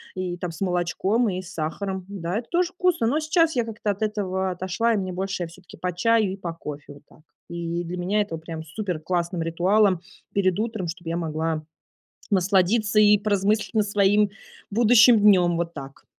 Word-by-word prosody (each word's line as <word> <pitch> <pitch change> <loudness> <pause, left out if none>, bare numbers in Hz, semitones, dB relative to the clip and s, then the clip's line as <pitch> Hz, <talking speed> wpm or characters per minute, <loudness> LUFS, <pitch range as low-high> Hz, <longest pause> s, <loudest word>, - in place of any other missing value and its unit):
и 180 -1 -3
там 175 -1 -4
с 160 - -12
молочком 190 +5 +1
и 185 0 -3
с 190 +2 -11
сахаром. 185 +4 -4
Да, 185 0 -3
это 235 - -10
тоже 350 0 +1
вкусно, 360 -10 +1
но 295 +6 +1
сейчас 320 0 +2
я 240 - +2
как-то 215 -2 -2
от 200 +2 -7
этого 190 -3 -1
отошла, 190 +6 0
и - - +1
мне 185 -2 -3
больше 190 -1 -3
всё-таки 175 +1 -15
по 180 - -2
чаю 220 +1 +2
и - - -7
по 170 -3 -5
кофе. 145 -3 -8
Вот 145 - -17
так. - - -21 0.3
И 170 0 -3
для 175 +2 -5
меня 195 +4 +1
это 180 -6 -3
прям 160 0 -7
суперклассным 170 -1 -3
ритуалом 185 +2 +2 0.3
перед 185 -1 +1
утром, 220 -5 -2
чтобы 170 0 -6
я 170 - -1
могла 160 -1 -2 0.7
насладиться 200 +3 +2
и 210 -1 +6
поразмыслить 210 +1 0
на 215 - +4
своим 205 0 +3 0.4
будущим 230 +1 +6
днём. 180 -5 +5
Вот 170 0 -3
так. 135 -1 -10
190 Hz, 185 wpm, -24 LUFS, 170-210 Hz, 0.7 s, и